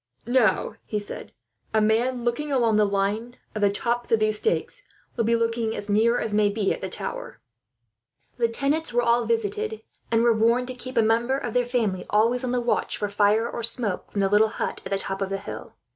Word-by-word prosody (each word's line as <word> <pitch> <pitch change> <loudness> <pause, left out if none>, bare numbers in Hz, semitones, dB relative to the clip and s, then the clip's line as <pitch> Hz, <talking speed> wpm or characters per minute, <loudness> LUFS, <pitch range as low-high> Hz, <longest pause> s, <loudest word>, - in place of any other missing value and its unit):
"Now," 235 -5 +2
he 210 - -2
said, 205 0 -7 0.4
"a - - +5
man, 235 +3 +1
looking 265 +5 -2
along 235 -5 +2
the 210 - +4
line 205 +5 -2 0.2
of 215 - -4
the 205 - +4
tops 235 +4 -2
of 225 - +4
these 215 0 +1
stakes, 485 - -1 0.3
will 230 - 0
be 230 +1 +3
looking 230 -1 -1
as 205 - -4
near 230 +3 +3
as 220 - -2
may 210 -1 +3
be 205 -1 0
at - - -8
the - - -4
tower." - - -6 1.0
The 235 -1 +2
tenants 285 +6 0
were 240 0 +1
all 235 0 +2
visited, 440 -1 -2 0.3
and 225 0 +3
were 235 -1 +5
warned 235 +3 +2
to - - -4
keep 255 0 -7
a 230 - +5
member 235 +4 +2
of 240 -4 -5
their 245 -1 +1
family 220 -7 -1
always 230 +4 +2
on 255 - -2
the 250 0 0
watch 240 - -1
for 205 - -2
fire, 210 +3 +2
or 235 - -5
smoke, 230 -4 +2
from 200 - -1
the 195 - +2
little 210 +2 +4
hut - - -4
at - - -8
the 195 - +1
top 195 0 -4
of 195 - -1
the 195 - -2
hill. 195 - -9
230 Hz, 220 wpm, -24 LUFS, 210-245 Hz, 1.0 s, a